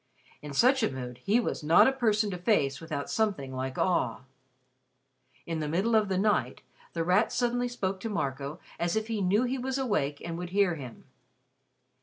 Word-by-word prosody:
In 150 - -8
such 255 - +4
a - - +2
mood, 125 -2 -7
he 215 +4 +3
was 235 - -2
not 160 +9 +6
a - - +4
person 220 -5 +1
to 180 - -4
face 155 - +1
without 155 -3 -4
something 195 -12 -1
like 130 0 -4
awe. 180 -7 +1 1.2
In 165 -1 -3
the 155 - -2
middle 190 +9 0
of 215 -2 +3
the 190 - 0
night, 210 +2 0 0.3
The 165 - -1
Rat 180 +6 +3
suddenly 245 0 0
spoke 195 -6 -3
to 225 - -4
Marco 140 -5 -3 0.2
as 170 +2 0
if 220 +1 -1
he 220 -3 -1
knew 200 +5 +3
that 250 - -1
he 265 - -1
was 260 +1 -2
awake 155 - -1
and 170 0 -4
would 180 0 -5
hear 195 -1 +2
him. 130 -7 -9
185 Hz, 195 wpm, -29 LUFS, 150-220 Hz, 1.2 s, not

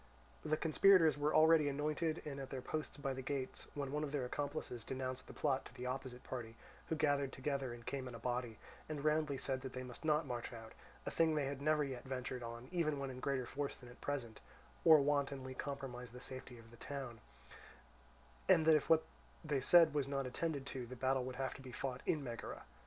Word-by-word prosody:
The 155 0 +1
conspirators 165 0 +6
were 145 +1 +1
all 155 0 +7
ready 160 -3 +6
anointed 155 +3 -1
and 140 -2 -4
at 135 - -5
their 135 - -3
posts 155 +2 -3
by 140 -2 -1
the 130 - -4
gates, 130 0 -3
when 140 -2 -2
one 150 +1 0
of 145 - -3
their 140 -4 0
accomplices 140 -3 -3
denounced 130 0 -4
the - - -9
plot 135 -3 +1
to - - -11
the 125 - -5
opposite 125 -1 -4
party, 115 -3 -5 0.3
who 160 - +1
gathered 145 -3 +2
together 135 -1 -2
and 120 0 -9
came 135 -2 -3
in 125 - -7
a - - -7
body, 120 -1 -2 0.3
and 150 -1 -3
roundly 150 -2 +2
said 130 0 -2
that 130 -1 -6
they 130 - -4
must 125 +3 -9
not 155 0 +3
march 120 -3 -4
out—a 115 -2 -9
thing 160 -1 +3
they 145 -2 +1
had 140 0 -3
never 155 0 +3
yet 130 -3 -4
ventured 130 -1 -4
on 120 +1 -6
even 160 -5 +1
when 135 -1 -3
in 125 - -7
greater 130 -1 0
force 140 +3 -3
than 125 - -13
at 120 - -15
present—or 145 +4 +2
wantonly 140 -2 0
compromise 130 -3 -5
the 125 +2 -10
safety 130 -1 -8
of 115 0 -14
the 120 - -14
town, 130 -4 -5 1.3
and 160 - +7
that 160 - +8
if 155 - +3
what 160 -1 +6 0.4
they 145 -3 +1
said 165 +1 +7
was 145 -2 +1
not 135 -1 -1
attended 140 +2 -2
to, 130 -3 -5
the 130 - -7
battle 130 +1 +1
would 130 0 -5
have 135 0 -2
to - - -11
be 130 -1 -9
fought 130 +1 -3
in 150 -3 +2
Megara. 120 -3 -5
135 Hz, 220 wpm, -38 LUFS, 125-150 Hz, 1.3 s, that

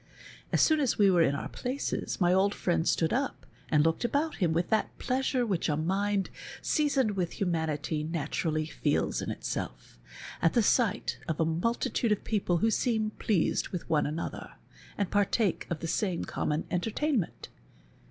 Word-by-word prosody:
As - - +3
soon 315 -1 +4
as 275 -5 +1
we 200 -2 +5
were 175 -2 +4
in 140 -3 +3
our - - -4
places 260 +3 -3
my 175 -1 +4
old 195 +2 +3
friend 170 -2 0
stood 165 -1 +1
up 270 +2 -2 0.2
and 150 -2 +4
looked 165 +6 +1
about 285 +6 0
him 175 -5 +1
with 170 +2 0
that 220 - +1
pleasure 255 -1 0
which 190 -7 0
a 150 - +1
mind 195 +4 0 0.3
seasoned 280 -7 +1
with 180 -4 -2
himianity 160 -3 -1
naturall}^ 155 -1 -1
feels - - 0
in - - -4
itself, - - -5 0.4
at 165 - +3
the 235 - +4
sight 225 -1 +1
of 160 - -2
a 165 - +3
multitude 230 +7 0
of 210 - +1
j)eople 185 -6 0
who 225 - +3
seem 220 -3 +1
pleased 195 -7 +1
with 180 - -5
one 150 -2 +3
another, 155 +3 -5 0.4
and 200 -3 -1
partake 205 -1 +1
of 170 - -3
the 165 - -3
same 175 +1 -1
common 150 +1 -2
entertainment. 225 - -1
190 Hz, 170 wpm, -29 LUFS, 165-225 Hz, 0.4 s, we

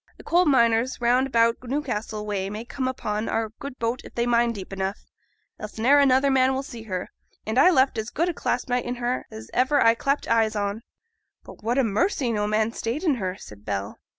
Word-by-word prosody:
Th' - - -13
coal 355 +2 +3
miners 235 -3 +3
round 250 +2 +3
about 230 -2 +3
Newcastle 235 -5 -3
way 195 -2 -2
may 215 +3 -6
come 260 +1 -3
upon 215 -4 -3
our 225 -1 -1
good 275 -2 -7
boat 230 +2 -2
if - - -13
they 235 - +1
mine 235 0 +3
deep 195 -3 -8
enough, 195 +1 -4 0.5
else 215 0 -8
ne'er 265 +6 +5
another 275 0 +4
man 260 0 +3
will 265 - -2
see 235 -4 -9
her. 185 -5 -5 0.3
And 220 +4 0
I - - +7
left 260 -8 +3
as 220 +1 -4
good 335 +5 0
a 355 - -1
clasp 245 -5 -2
knife 245 0 0
in 245 - -3
her 245 +1 -2
as 110 0 -10
ever 260 +3 +3
I 230 -2 +6
clapt 275 +5 -1
eyes 225 -1 +2
on.' 205 +1 -2 0.6
'But - - -13
what 235 +4 0
a 270 - +4
mercy 235 - 0
no 210 -2 0
man 215 +1 +1
stayed 235 +9 -3
in 300 -8 +2
her,' 185 0 -3
said 105 - -13
Bell. 100 -1 -4
235 Hz, 220 wpm, -25 LUFS, 215-260 Hz, 0.6 s, I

